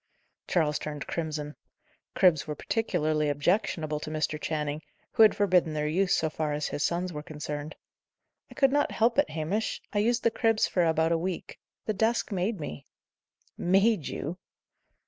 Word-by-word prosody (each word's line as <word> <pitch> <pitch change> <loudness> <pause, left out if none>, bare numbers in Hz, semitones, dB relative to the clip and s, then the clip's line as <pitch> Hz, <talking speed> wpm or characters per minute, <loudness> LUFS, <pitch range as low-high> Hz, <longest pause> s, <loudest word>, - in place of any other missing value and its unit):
Charles 150 -4 +1
turned 150 -2 -5
crimson. 155 -3 -4 0.6
Cribs 175 -7 +4
were 150 - -3
particularly 155 -7 0
objectionable 155 0 0
to 150 - -6
Mr. 155 -1 -2
Channing, 150 -1 -2 0.3
who 225 - +2
had 215 -2 +7
forbidden 180 -5 +3
their 150 0 0
use, 180 +5 +2
so 160 - +1
far 155 -1 -2
as 150 0 -2
his - - -4
sons 175 +2 0
were 150 - -5
concerned. 150 0 -6 0.7
"I - - -14
could 270 -1 +4
not 290 +1 +2
help 235 +4 +2
it, 285 - +3
Hamish. 165 +8 -2
I 205 - +2
used 235 +3 +1
the 230 - +3
cribs 225 -2 +2
for 180 - +1
about 160 0 +2
a 165 - +2
week. 180 +1 -4 0.3
The 215 - 0
desk 225 +3 0
made 195 +2 -1
me." 75 - -7 0.7
"Made 195 -1 +3
you!" 170 +5 -5
165 Hz, 165 wpm, -28 LUFS, 150-205 Hz, 0.7 s, had